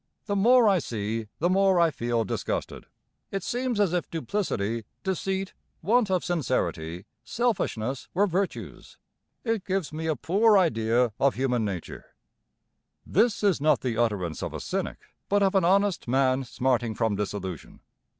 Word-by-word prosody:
The 200 Hz, -, -1 dB
more 235 Hz, +4 st, +5 dB
I 195 Hz, -3 st, +4 dB
see 110 Hz, -4 st, -3 dB
the 170 Hz, -, +1 dB
more 190 Hz, 0 st, +3 dB
I 170 Hz, -1 st, +4 dB
feel 120 Hz, -3 st, -1 dB
disgusted. -, -, -4 dB, 0.4 s
It 195 Hz, -2 st, -3 dB
seems 245 Hz, -1 st, -1 dB
as 195 Hz, -4 st, +2 dB
if 180 Hz, -, -1 dB
duplicity, 115 Hz, -, -2 dB, 0.2 s
deceit, 190 Hz, 0 st, -2 dB, 0.3 s
want 220 Hz, +3 st, +3 dB
of 185 Hz, -2 st, 0 dB
sincerity, 95 Hz, -, -2 dB, 0.2 s
selfishness 135 Hz, -, -1 dB
were 200 Hz, +3 st, +4 dB
virtues. 190 Hz, 0 st, -4 dB, 0.5 s
It 225 Hz, -4 st, -1 dB
gives 185 Hz, -5 st, -2 dB
me 160 Hz, +1 st, -3 dB
a 160 Hz, -, +1 dB
poor 205 Hz, -, +3 dB
idea 120 Hz, -, +2 dB
of 140 Hz, -1 st, +3 dB
human 125 Hz, -2 st, 0 dB
nature.' 95 Hz, -5 st, -6 dB, 0.9 s
This 215 Hz, +2 st, +2 dB
is 195 Hz, -8 st, +2 dB
not 150 Hz, -2 st, +3 dB
the 125 Hz, -3 st, -2 dB
utterance 105 Hz, -8 st, -1 dB
of -, -, -4 dB
a -, -, -4 dB
cynic, -, -, -3 dB, 0.3 s
but 205 Hz, 0 st, +3 dB
of 195 Hz, 0 st, +2 dB
an 195 Hz, -2 st, +3 dB
honest 195 Hz, -2 st, +2 dB
man 130 Hz, +1 st, +2 dB
smarting 120 Hz, -3 st, 0 dB
from 110 Hz, -2 st, 0 dB
disillusion. 95 Hz, -4 st, -5 dB
160 Hz, 150 wpm, -26 LUFS, 115-195 Hz, 0.9 s, more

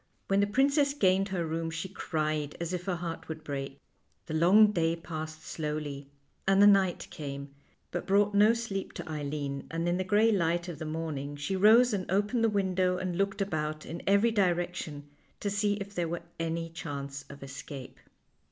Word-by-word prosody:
When 195 Hz, 0 st, +3 dB
the 200 Hz, -, +3 dB
princess 280 Hz, +5 st, +3 dB
gained 195 Hz, -5 st, +3 dB
her 180 Hz, -3 st, -1 dB
room 165 Hz, +1 st, -2 dB
she 165 Hz, +3 st, -4 dB
cried 155 Hz, -5 st, -2 dB
as 170 Hz, +1 st, -3 dB
if 180 Hz, 0 st, -3 dB
her 185 Hz, -, 0 dB
heart 170 Hz, -1 st, -5 dB
would 155 Hz, -1 st, -6 dB
break. 135 Hz, -2 st, -5 dB, 0.5 s
The 160 Hz, -, -6 dB
long 195 Hz, +7 st, +6 dB
day 165 Hz, -3 st, +1 dB
passed 155 Hz, -1 st, -6 dB
slowly, 150 Hz, -3 st, -4 dB, 0.4 s
and 195 Hz, 0 st, +5 dB
the 205 Hz, -, +8 dB
night 195 Hz, -3 st, +4 dB
came, 140 Hz, -1 st, -6 dB, 0.4 s
but 175 Hz, -, -4 dB
brought 200 Hz, +1 st, +3 dB
no 210 Hz, +3 st, +6 dB
sleep 205 Hz, -5 st, -4 dB
to -, -, -7 dB
Eileen, 145 Hz, -2 st, -4 dB
and 165 Hz, +1 st, -2 dB
in 175 Hz, +1 st, +1 dB
the 185 Hz, -, 0 dB
gray 210 Hz, +4 st, +4 dB
light 175 Hz, -3 st, +1 dB
of 170 Hz, -4 st, -6 dB
the 160 Hz, -, -4 dB
morning 155 Hz, -3 st, -4 dB
she 145 Hz, +7 st, -2 dB
rose 220 Hz, +5 st, +6 dB
and 190 Hz, -3 st, -2 dB
opened 210 Hz, +5 st, +1 dB
the 225 Hz, -, +4 dB
window, 185 Hz, -3 st, +1 dB
and 185 Hz, -1 st, -2 dB
looked 195 Hz, +2 st, 0 dB
about 155 Hz, -4 st, -3 dB
in 170 Hz, +2 st, -6 dB
every 200 Hz, +4 st, +4 dB
direction 175 Hz, -7 st, -1 dB, 0.3 s
to 205 Hz, -, -2 dB
see 205 Hz, 0 st, +1 dB
if 200 Hz, 0 st, -7 dB
there 175 Hz, -3 st, -1 dB
were 170 Hz, 0 st, -4 dB, 0.2 s
any 165 Hz, 0 st, -2 dB
chance 140 Hz, -4 st, -6 dB
of 140 Hz, 0 st, -10 dB
escape. 135 Hz, 0 st, -8 dB
175 Hz, 190 wpm, -30 LUFS, 155-200 Hz, 0.5 s, the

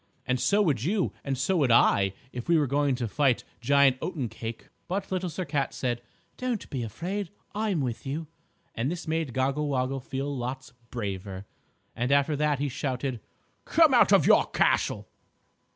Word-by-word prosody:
And 125 Hz, 0 st, 0 dB
so 205 Hz, +8 st, +3 dB
would 140 Hz, -, +1 dB
you 190 Hz, +5 st, 0 dB
and 135 Hz, -1 st, -2 dB
so 175 Hz, +9 st, +1 dB
would 140 Hz, -6 st, +3 dB
I 100 Hz, -4 st, +4 dB, 0.2 s
if 125 Hz, +5 st, -6 dB
we 170 Hz, -, +5 dB
were 150 Hz, -, +3 dB
going 140 Hz, 0 st, +1 dB
to 120 Hz, -2 st, -2 dB
fight 135 Hz, +2 st, +2 dB, 0.2 s
Giant 135 Hz, +1 st, +4 dB
Oatencake. 115 Hz, -, -5 dB, 0.2 s
But 195 Hz, +2 st, -3 dB
Little 185 Hz, -1 st, -1 dB
Sir 180 Hz, +3 st, -4 dB
Cat 140 Hz, -3 st, -1 dB
said: 120 Hz, -2 st, -2 dB, 0.4 s
"Don't 250 Hz, -4 st, -2 dB
be 130 Hz, -, -2 dB
afraid. 170 Hz, -, -4 dB, 0.2 s
I'm 205 Hz, -6 st, 0 dB
with 125 Hz, -4 st, -3 dB
you!" 150 Hz, +5 st, -3 dB, 0.5 s
and 120 Hz, +4 st, -1 dB
this 175 Hz, 0 st, -5 dB
made 160 Hz, -3 st, -1 dB
Goggle 135 Hz, +4 st, 0 dB
Woggle 135 Hz, -1 st, 0 dB
feel 135 Hz, +2 st, -4 dB
lots 130 Hz, +1 st, -5 dB, 0.2 s
braver. 100 Hz, -4 st, -5 dB, 0.5 s
And 120 Hz, +3 st, -1 dB
after 140 Hz, +2 st, +3 dB
that 150 Hz, 0 st, +1 dB
he 145 Hz, +2 st, -1 dB
shouted: 130 Hz, -2 st, -3 dB, 0.5 s
"Come -, -, +5 dB
out -, -, +6 dB
of -, -, +6 dB
your -, -, +6 dB
castle!" -, -, +1 dB
135 Hz, 170 wpm, -27 LUFS, 125-160 Hz, 0.5 s, out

